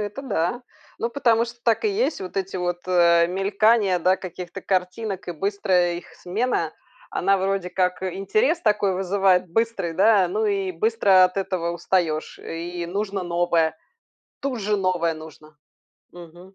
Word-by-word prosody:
Это 210 +6 -5
да. 220 -1 -1 0.4
Ну, 235 - -2
потому 235 -4 +2
что 240 0 -10
так 230 - +2
и - - +4
есть: 405 - 0
вот 185 0 -7
эти 190 -1 -2
вот, 175 -1 -2
э, 170 -2 +4
мелькания, 200 +1 +2
да, 185 +3 +3
каких-то 180 -1 -8
картинок 190 +1 -2
и - - -2
быстрая 180 -1 +1
их 175 - -7
смена- 180 -4 -2 0.4
она 195 +2 +2
вроде 195 -1 -1
как 180 0 -1
интерес 330 - 0
такой 210 -3 +2
вызывает 190 -1 +2
быстрый, 225 -4 -1
да, 195 0 +4
ну 215 +4 0
и 195 -2 -1
быстро 195 0 +4
от 180 +1 -1
этого 185 -3 -1
устаешь. 170 -3 -1
И 170 +1 -5
нужно 195 +1 -3
новое. 170 -2 +1 0.7
Тут 265 -4 -2
же 210 +1 0
новое 180 -4 0
нужно. 155 -1 -13 0.5
Мгм. 175 +2 -14
190 Hz, 150 wpm, -23 LUFS, 175-210 Hz, 0.7 s, и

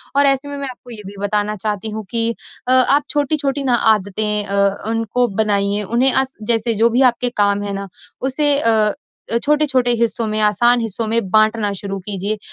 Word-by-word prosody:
और 285 0 +4
ऐसे 275 +1 +1
में, 285 - -6
मैं 280 - -5
आपको 250 -1 -13
ये 215 -3 -10
भी 200 - -11
बताना 210 +1 -1
चाहती 210 +1 -3
हूँ 215 0 -6
कि 230 -1 +1 0.4
अ, 255 - +2
आप 270 +3 +4
छोटी-छोटी 285 -1 -1
ना 255 -3 +2 0.2
आदतें 210 +1 -2
अ, 200 +1 0
उनको 225 +2 -1 0.2
बनाइए 205 0 0
उन्हें 240 +6 +2
अ, 265 - +4 0.2
जैसे 230 +1 +1
जो 235 - +5
भी 240 +3 +1
आपके 245 +1 0
काम 200 0 0
है 200 -1 -4
ना 195 0 -5 0.3
उसे 285 +2 +2
अ, 220 -4 +3 0.5
छोटे-छोटे 285 -4 +2
हिस्सों 230 0 -1
में 215 0 -1
आसान 235 +4 +3
हिस्सों 225 0 -3
में 225 -3 -1
बाँटना 215 -1 +2
शुरू 195 -1 -5
कीजिए। 205 +1 -2
225 Hz, 185 wpm, -18 LUFS, 205-255 Hz, 0.5 s, जो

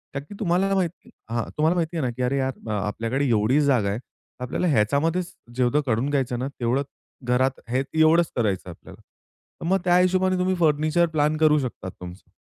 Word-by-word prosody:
नक्की 145 +9 -6
तुम्हाला 195 0 +1
माहिती 180 -3 -2 0.2
हां, 115 -1 0
तुम्हाला 160 +3 +3
माहिती 170 -1 -1
आहे 150 - 0
ना, - - 0
की 125 +2 -7
अरे 135 +3 0
यार 130 -3 -3
आपल्याकडे 115 +7 -2
एवढीच 115 +7 +3
जागा 125 -8 +2
आहे 105 +4 -2 0.4
आपल्याला 130 +8 -1
ह्याच्यामध्येच 160 - +1 0.2
जेवढं 130 +4 +2
करुन 120 +5 +1
घ्यायचं 130 -4 -1
ना 130 - -2
तेवढं 125 +4 +1 0.4
घरात 125 +2 +1
हे 125 +2 +1
एवढंच 160 +1 +4
करायचंय 95 -5 -1
आपल्याला, - - -14 0.6
तर - - -5
मग 190 +1 +3
त्या 175 0 +5
हिशोबाने 185 +1 +2
तुम्ही 185 +1 +1
फर्निचर 155 +2 +3
प्लॅन 150 0 +2
करू 155 -1 +4
शकता 120 -7 -5
तुमचं. 90 +1 -11
140 Hz, 180 wpm, -24 LUFS, 120-170 Hz, 0.6 s, त्या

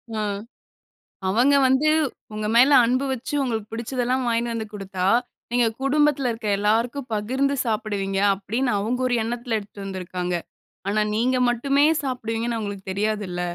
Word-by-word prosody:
ஆ, - - -1 1.1
அவங்க 245 +8 +4
வந்து 265 +4 +3 0.4
உங்க 215 0 -3
மேல 255 +5 +6
அன்பு 255 +3 +1
வச்சு, 260 +3 -6
உங்களுக்கு 225 -4 -2
பிடிச்சதெல்லாம் 250 +2 -1
வாங்கினு 235 0 0
வந்து 220 -1 -4
கொடுத்தா, 195 -2 -4 0.5
"நீங்க 240 -1 +3 0.2
குடும்பத்தில 280 -1 +2
இருக்க 225 -1 -5
எல்லாருக்கும் 235 +5 0
பகிர்ந்து 260 +7 0
சாப்பிடுவீங்க." 205 -4 -1
அப்பிடின்னு 215 +6 -1
அவுங்க 235 +5 -1
ஒரு 245 - +1
எண்ணத்தில 235 0 -2
எடுத்துட்டு 200 -1 -10
வந்துருக்காங்க. 180 -2 -3 0.5
ஆனா, 215 +1 +1
நீங்க 255 +3 +2
மட்டுமே 275 +4 +2 0.2
சாப்பிடுவீங்கன்னு 235 -3 -2
அவுங்களுக்கு 200 -2 -6
தெரியாதுல்ல. 200 -3 -2
230 Hz, 135 wpm, -23 LUFS, 205-255 Hz, 1.1 s, மேல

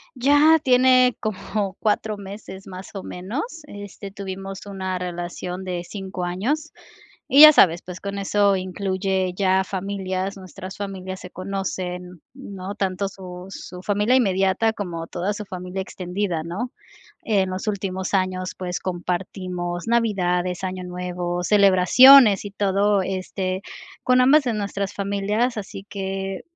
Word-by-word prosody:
Ya 290 +5 +5
tiene 255 -1 +5
como 200 -1 -3
4 215 0 0
meses, 195 -1 -9
más 185 0 -9
o 195 - -5
menos, 200 - -4 0.2
este, 205 -3 -9
tuvimos 195 0 -7
una 190 -2 -3
relación 180 +1 -5
de 180 -2 -3
5 190 -3 -6
años, 255 - -2 0.6
y 280 - +8
ya 310 0 +12
sabes, 170 - +5
pues, 180 0 -9
con 200 0 -4
eso 200 0 +2
incluye 190 0 -1
ya 190 -1 +3
familias, 190 0 -3
nuestras 190 0 -9
familias 190 -2 -5
se 180 - -9
conocen, 180 -2 -5
¿no?, 200 -7 -7
tanto 195 -1 -1
su 180 -2 -9
su 180 -1 -9
familia 210 +5 +2
inmediata 195 -1 +2
como 175 -6 -5
toda 180 +4 -2
su 210 +1 -6
familia 185 0 -5
extendida, 180 -2 -3
¿no?, 200 +10 -4 0.5
en 195 -4 +1
los 185 +4 -5
últimos 190 -2 -2
años, 185 -1 -1
pues, 180 -1 -3
compartimos 180 0 -4
navidades, 185 -6 +1
Año 185 0 -3
Nuevo, 180 0 -3
celebraciones 205 +4 +7
y 205 - -6
todo, 200 0 +2
este, 185 0 -3 0.4
con 255 0 +4
ambas 280 +5 +6
de 245 -3 -1
nuestras 200 -1 -3
familias, 200 +4 0
así 195 -1 -7
que 195 -1 -4
195 Hz, 135 wpm, -23 LUFS, 185-205 Hz, 0.6 s, ya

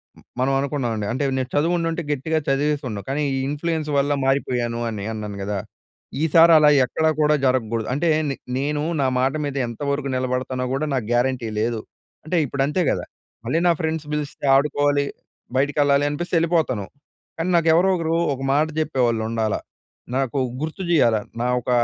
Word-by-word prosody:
హ్మ్, - - -19 0.2
మనం 130 +2 +2
అనుకున్నామండి. 125 -7 -2
అంటే, 130 +4 -1
నేను 130 -1 -2
చదువుండుంటే 165 +2 +1
గట్టిగా 150 +3 -1
చదివేసిండు. 135 -6 0
కానీ, 140 +3 -1
ఈ - - -1
ఇన్‌ఫ్లూయెన్స్ 155 +1 -2
వల్ల 140 +1 +2
మారిపోయాను 125 -3 0
అని 105 -3 -5
అన్నాను 105 -2 -5
గదా! 100 +1 -2 0.7
ఈసారి 165 +1 +6
అలా 150 -1 +6 0.2
ఎక్కడా 160 +5 +1
కూడా 150 0 +4
జరగకూడదు 115 -3 0
అంటే, 165 +5 +1 0.2
నె 135 - -2 0.2
నేను 145 +2 -1 0.2
నా 135 - +2
మాట 130 +1 +2
మీద 140 -1 -4
ఎంతవరకు 140 +4 -3
నిలబడతానో 130 0 -2
కూడా 145 +3 -1
నాకు 130 -5 -1
గ్యారంటీ 120 -1 +1
లేదు. 115 0 -1 0.4
అంటే 175 +3 0
ఇప్పుడు 135 +1 -1
అంతే 150 +5 0
కదా! - - -2 0.4
మళ్ళీ 130 +8 +1
నా - - +6
ఫ్రెండ్స్ 160 -1 -2
పిలిస్తే 145 -1 -4
ఆడుకోవాలి, 145 0 +2 0.5
బయటికెళ్ళాలి 145 0 +2
అనిపిస్తే 175 +4 -3
ఎళ్ళిపోతాను. 160 - 0 0.5
కానీ, 165 +3 -1
నాకు 165 -1 +2
ఎవరో 185 +3 +4
ఒకరు 165 0 0 0.2
ఒక 135 - -10
మాట 150 +2 +3
చెప్పేవాళ్ళు 120 -7 0
ఉండాలా. 110 -2 -1 0.6
నాకు 135 0 -1 0.2
గుర్తు 160 +5 -4
చేయాల. 120 -9 +4 0.2
నా 120 - +1
ఒక 120 - -7
140 Hz, 160 wpm, -22 LUFS, 125-155 Hz, 0.7 s, ఈసారి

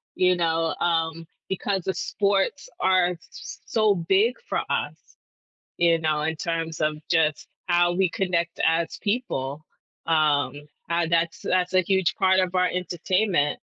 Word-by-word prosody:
you 180 -1 +3
know, 165 -1 0
um, 165 -1 0 0.2
because 190 -1 -2
the 190 - -1
sports 205 - -1
are 185 -1 +3
s 175 - -7 0.2
s - - -9
so 215 -5 +2
big 195 +8 +2
for - - 0
us, - - -1 0.8
you 170 -1 +4
know, 155 -1 0
in 160 +1 -1
terms 165 0 -3
of 155 0 0
just 155 -3 +1 0.2
how 175 0 +3
we 185 -1 +2
connect 170 -2 -1
as 165 0 +1
people, 155 - -2 0.4
um, 150 -4 +2 0.4
uh, 170 -1 +1
that's 170 0 +1
that's 180 0 0
a 185 - +5
huge 190 -1 +1
part 190 0 +3
of 185 0 0
our 180 0 +3
entertainment, 180 -2 0
175 Hz, 150 wpm, -24 LUFS, 165-190 Hz, 0.8 s, a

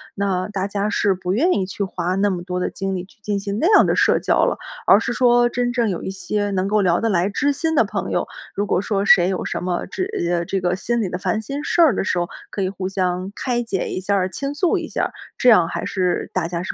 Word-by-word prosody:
那 195 -2 -1
大 195 -2 -3
家 200 +1 -1
是 200 -1 +2
不 185 0 -3
愿 330 - +3
意 195 - 0
去 200 - -3
花 180 -1 -2
那 200 +1 +2
么 180 -2 -3
多 180 0 -4
的 180 - 0
精 195 0 -3
力 180 0 -4
去 195 - -25
进 205 -1 -2
行 200 +1 -3
那 330 - +2
样 - - +6
的 - - +1
社 - - +4
交 - - +2
了。 - - 0 0.3
而 200 - +7
是 230 - -2
说 240 -1 +4
真 245 0 -1
正 235 -3 +1
有 180 - -3
一 - - -4
些 200 +2 -2
能 190 0 0
够 210 +1 +2
聊 175 -3 +2
得 230 - +1
来 185 -1 +1
知 285 +8 +1
心 320 +3 -1
的 - - +5
朋 - - -4
友， - - 0 0.3
如 205 - 0
果 185 - +1
说 200 -1 -1
谁 180 -3 +6
有 190 - -2
什 - - -3
么 180 -1 -2
知 375 +1 -4 0.2
呃， 170 -1 0
这 195 +3 -1
个 175 0 +1
心 235 +5 -1
里 195 - -1
的 180 - -3
烦 215 - -1
心 275 +6 -4
事 - - -1
儿 315 -7 +6
的 - - -1
时 185 - -1
候， 175 0 0 0.2
可 200 - -4
以 185 - 0
互 190 -1 -4
相 185 0 -2
开 245 -2 -1
解 215 -6 -2
一 - - -3
下 200 +2 0
儿、 185 -2 +1
倾 275 +8 -4
诉 340 +3 +2
一 - - -5
下 - - -2
儿， - - -1 0.3
这 250 - +4
样 180 -8 +6
还 - - -4
是 180 -2 -1
大 180 -3 0
家 170 0 -4
是 - - -3
195 Hz, 300 characters per minute, -21 LUFS, 185-225 Hz, 0.3 s, 而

